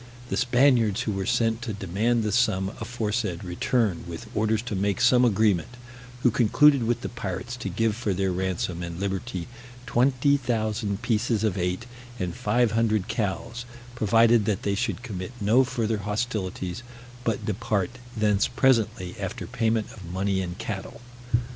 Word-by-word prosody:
The - - -1
Spaniards 125 -4 +3
who 110 - -1
were 95 -1 -2
sent 115 -1 +1
to 120 -3 -4
demand 105 +5 0
the 105 - 0
sum 100 -4 +2
aforesaid 110 -5 -2
returned, 90 +1 0
with 85 -1 -7
orders 110 +1 +1
to 120 -4 -4
make 100 0 0
some 125 -1 +5
agreement; 110 -2 +2 0.5
who 125 - +5
concluded 140 +5 +5
with 120 +1 0
the - - -4
pirates 120 +2 -5
to 120 - -4
give 115 -2 0
for 115 -3 -2
their 95 0 0
ransom 90 -1 -2
and 85 0 -5
liberty 95 -2 -3 0.4
20,000 120 -5 +1
pieces 115 -1 +1
of 105 -4 +1
eight, 90 +3 -1 0.3
and 90 -4 -2
five 120 0 +2
hundred 110 -3 +1
cows, 115 +3 -3 0.3
provided 115 0 +4
that 105 -3 -1
they 100 - +1
should 100 +4 -2
commit 95 -3 -5
no 110 +5 +4
further 115 -4 -1
hostilities, 105 -3 -3 0.4
but 115 -4 -1
depart 105 -1 -1 0.3
thence 105 -2 +3
presently 115 -8 +1
after - - -4
payment 110 -1 0
of 95 -6 -10
money 95 +1 0
and 90 -1 -5
cattle. - - -6
110 Hz, 155 wpm, -26 LUFS, 95-120 Hz, 0.5 s, some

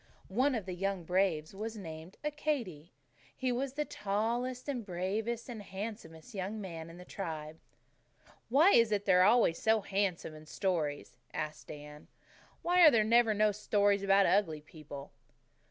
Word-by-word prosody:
One 255 +7 +2
of 215 -5 -3
the 185 - -4
young 195 0 -2
braves 180 -3 0
was 220 +3 -5
named 165 -1 -9
Accadee. 265 - -2 0.5
He 255 -1 0
was 260 +2 -2
the 300 +1 -2
tallest 235 +6 -2
and 260 -5 -2
bravest 210 +5 -3
and 235 -4 -7
handsomest 200 -1 -8
young 200 +2 -4
man 165 -5 -7
in 165 - -12
the 180 - -11
tribe 160 -5 -6 0.5
" - - -28
"Why 300 +10 +6
is 230 - +5
it 205 -1 0
they're 180 -2 +5
always 205 -4 +4
so 220 0 +3
handsome 195 -5 -1
in 155 0 -13
stories?" 150 -9 -2 0.2
asked 155 0 -4
Dan. 150 0 -10 0.6
"Why 355 +1 +4
are 325 - +11
there 230 -6 +4
never 225 0 +4
no 210 0 +3
stories 205 -1 +2
about 195 0 +4
ugly 165 -6 +2
people?" 150 -2 -10
200 Hz, 160 wpm, -32 LUFS, 165-230 Hz, 0.6 s, are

